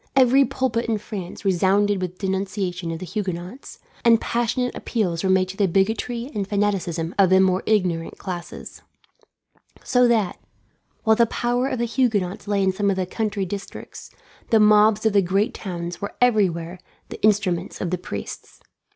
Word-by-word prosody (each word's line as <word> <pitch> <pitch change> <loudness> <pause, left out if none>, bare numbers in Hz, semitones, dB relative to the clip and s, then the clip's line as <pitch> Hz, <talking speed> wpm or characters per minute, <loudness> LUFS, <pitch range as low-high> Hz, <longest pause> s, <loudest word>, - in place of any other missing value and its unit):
Every 265 +1 +5
pulpit 255 -2 -1
in 220 - +1
France 200 -2 -8
resounded 195 +2 +2
with 180 0 -4
denunciations 190 -3 -3
of 165 - -4
the 185 - -7
Huguenots, 185 - -5 0.3
and 230 -1 +5
passionate 240 +2 -1
appeals 180 -8 -2
were 190 - +1
made 190 0 +3
to 195 - -8
the 200 - +3
bigotry 225 - -1
and 200 -3 -2
fanaticism 190 -5 -1
of 190 -2 +6
the 190 0 +5
more 190 0 +3
ignorant 180 -6 0
classes; 175 -3 -7 1.0
so 250 -1 +3
that, 220 -6 +1 0.6
while 220 0 +4
the 235 +1 +4
power 245 +3 0
of 265 -2 -2
the 235 - 0
Huguenots 215 -5 -1
lay 200 -1 +1
in 190 - +3
some 200 +1 0
of 195 - +1
the 185 -1 -1
country 205 0 -2
districts, 195 +1 -8 0.4
the 225 - +5
mobs 210 0 +5
of 220 - +3
the 200 - +5
great 195 +6 0
towns 175 -3 -6
were 200 - -5
everywhere 185 -8 +1 0.3
the - - -9
instruments 200 -4 +1
of 175 - -3
the 180 - 0
priests. 100 - -8
200 Hz, 170 wpm, -23 LUFS, 185-220 Hz, 1.0 s, of